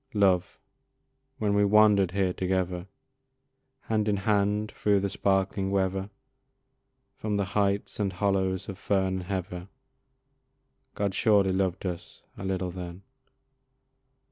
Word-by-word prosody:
Love! 95 -3 +2 0.8
when 105 -2 0
we 100 0 +4
wander'd 100 -2 +5
here 95 0 0
together, 90 -1 -1 0.9
Hand 110 -1 -1
in 100 - +1
hand 105 +1 +1
through 100 -1 +2
the 100 0 -1
sparkling 95 0 0
weather, 95 0 0 1.0
From 105 -1 -3
the 100 -1 +1
heights 100 +1 -1
and 100 -2 0
hollows 95 -1 0
of 100 -1 -7
fern 95 -2 +1
and 95 - -5
heather, 90 -1 -4 1.3
God 100 -2 -1
surely 100 -2 +3
loved 95 0 -1
us 85 -2 -6
a - - -8
little 95 -1 -2
then. 90 +1 -8
95 Hz, 120 wpm, -28 LUFS, 95-100 Hz, 1.3 s, wander'd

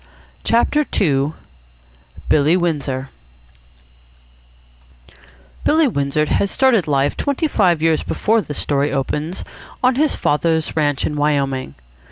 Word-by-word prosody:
CHAPTER 265 +6 +2 0.2
II 145 -4 +1 0.9
BILLY 155 +4 +3
WINDSOR 140 -6 -2 2.5
Billy 315 0 +3
Windsor 140 - 0
had 200 +6 0
started 245 -9 +2
life 140 -1 +1
twenty 285 +2 -1
five 180 - +2
years 165 -1 +2
before 225 +1 0
this 145 -7 -7
story 145 0 0
opens 150 +6 -3 0.4
on 255 +1 +4
his 300 +1 +2
father's 160 +1 0
ranch 145 -3 0
in 150 - -3
Wyoming. 140 - -1
155 Hz, 110 wpm, -19 LUFS, 140-205 Hz, 2.5 s, on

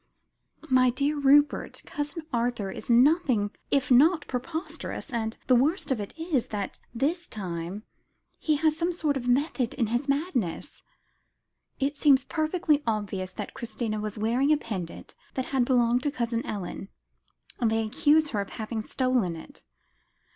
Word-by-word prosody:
"My 255 -2 +5
dear 285 +4 0
Rupert, 285 +1 +3
Cousin 295 +3 -4
Arthur 235 -4 -1
is - - -9
nothing 245 - +4 0.2
if 275 -1 +1
not 305 +6 +5
preposterous, 290 +4 -5
and 225 -1 -2
the 255 - +4
worst 290 +7 +2
of 255 - +1
it 205 - -5
is, 325 -7 -1
that 205 -2 -4
this 305 +9 -1
time 180 0 -5 0.6
he 310 - +1
has 310 +1 +2
some 340 +2 0
sort 310 -4 0
of 250 -2 -3
method 255 -1 +1
in 245 - +1
his 270 +4 -1
madness. 275 - -2 1.0
It 280 +2 -1
seems 280 -3 +5
perfectly 315 -1 +1
obvious, 200 -4 -2
that - - -6
Christina 225 -3 -3
was 215 0 -4
wearing 240 +7 +2
a 305 - +5
pendant 190 - -6 0.2
that 260 - -1
had 260 -2 +3
belonged 245 -1 +3
to 290 - 0
Cousin 235 -4 -2
Ellen; 195 -1 -5 0.7
and 235 -4 +2
they 225 0 +1
accuse 300 +7 +3
her 210 -6 -1
of 200 - -6
having 220 0 -4
stolen 245 -7 0
it." 220 - -12
255 Hz, 155 wpm, -27 LUFS, 220-290 Hz, 1.0 s, My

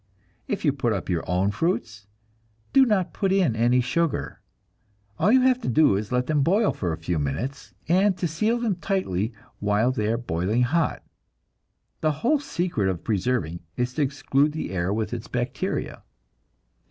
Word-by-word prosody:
If 200 - -2
you 145 - +3
put 120 -5 0
up 100 - -4
your 85 -2 0
own 95 +3 +2
fruits, 110 - -2 0.7
do 265 -1 +6
not 195 -5 +1
put 195 -2 0
in 185 - +2
any 120 +2 +3
sugar. 165 +6 -1 0.8
All 195 +6 +4
you 260 +1 +6
have 255 -1 +3
to - - -4
do 145 -3 +4
is 105 +2 -2
to 125 - -1
let 125 0 +1
them 150 0 +1
boil 200 +9 +3
for 90 -3 -2
a 80 - -3
few 85 0 -2
minutes, 90 - -4
and 190 +3 +3
to 175 - -1
seal 215 +10 0
them 225 -6 -1
tightly 125 - -1 0.3
while 105 +4 +2
they 110 -4 -1
are 115 - +1
boiling 105 +1 0
hot. 160 +6 0 1.0
The 155 -1 +1
whole 300 +4 +4
secret 170 - -1
of 90 -3 -3
preserving 100 -5 -1 0.2
is 125 0 -1
to 150 - -1
exclude 140 +1 +1
the 155 - -4
air 90 0 -1
with 110 +1 -2
its - - -5
bacteria. - - -3
130 Hz, 175 wpm, -25 LUFS, -, 1.0 s, do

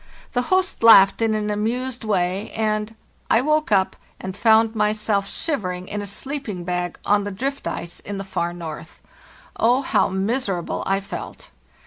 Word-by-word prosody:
The 245 - +1
host 375 0 +1
laughed 210 -3 +7
in 225 -1 +2
an 210 0 -1
amused 240 +4 -2
way, 190 -1 0
and—I 220 +1 -1
woke 305 -1 +1
up 190 -2 +3 0.2
and 190 0 -6
found 220 +1 +4
myself 210 -2 0
shivering 185 - -3
in 205 - -3
a 205 - -6
sleeping 220 -3 -5
bag 180 0 -2
on 205 0 +3
the 205 - -3
drift 270 +8 -3
ice 170 0 -5
in 205 0 -6
the 195 - -4
far 175 -3 -2
north. 165 -2 -8 0.6
Oh, 245 +4 +3
how - - +2
miserable 195 -1 -1
I 195 +1 +1
felt! - - -8
210 Hz, 155 wpm, -22 LUFS, 190-230 Hz, 0.6 s, laughed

